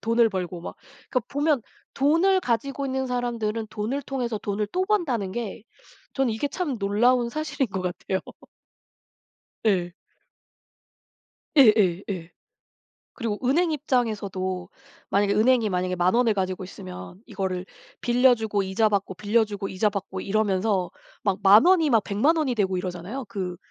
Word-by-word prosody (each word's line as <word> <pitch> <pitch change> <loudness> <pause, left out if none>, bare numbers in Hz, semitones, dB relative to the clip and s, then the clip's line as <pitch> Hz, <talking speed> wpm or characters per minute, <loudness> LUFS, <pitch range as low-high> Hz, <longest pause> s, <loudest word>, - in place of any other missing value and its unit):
돈을 230 0 +3
벌고 180 -3 -4
막 - - -7 0.4
그니까 255 - +1
보면 290 -3 +1 0.3
돈을 335 +7 +3
가지고 275 - -1
있는 265 0 -1
사람들은 230 -3 -2
돈을 230 +7 -3
통해서 250 -4 -3
돈을 205 +1 -2
또 370 +1 +1
번다는 260 - 0
게 225 -3 -5 0.5
저는 270 -4 +1
이게 250 +6 -2
참 300 -8 -3
놀라운 235 +5 +2
사실인 305 -3 -2
것 190 - -4
같아요. 185 +1 -2 1.5
예. 175 -4 +1 1.6
예예예. 195 - +3 0.8
그리고 225 -4 -3
은행 330 +5 +3
입장에서도 200 - -1 0.4
만약에 200 0 +2
은행이 230 -1 +3
만약에 180 0 -1
10,000 180 +2 +2
원을 235 -2 +3
가지고 185 -1 -2
있으면 90 - -9
이거를 190 -4 -3 0.3
빌려주고 240 -5 +3
이자 210 +3 +1
받고 200 -2 -1
빌려주고 205 -1 0
이자 200 +3 +1
받고 195 -2 -5
이러면서 195 -2 0 0.3
막 195 -2 +1
10,000 205 +7 +8
원이 350 -4 +5
막 225 -3 +4
1,000,000 275 +12 +2
원이 280 -6 0
되고 190 -4 +1
이러잖아요. 185 +8 -5
그 185 -3 -4
215 Hz, 295 characters per minute, -25 LUFS, 190-255 Hz, 1.6 s, 10,000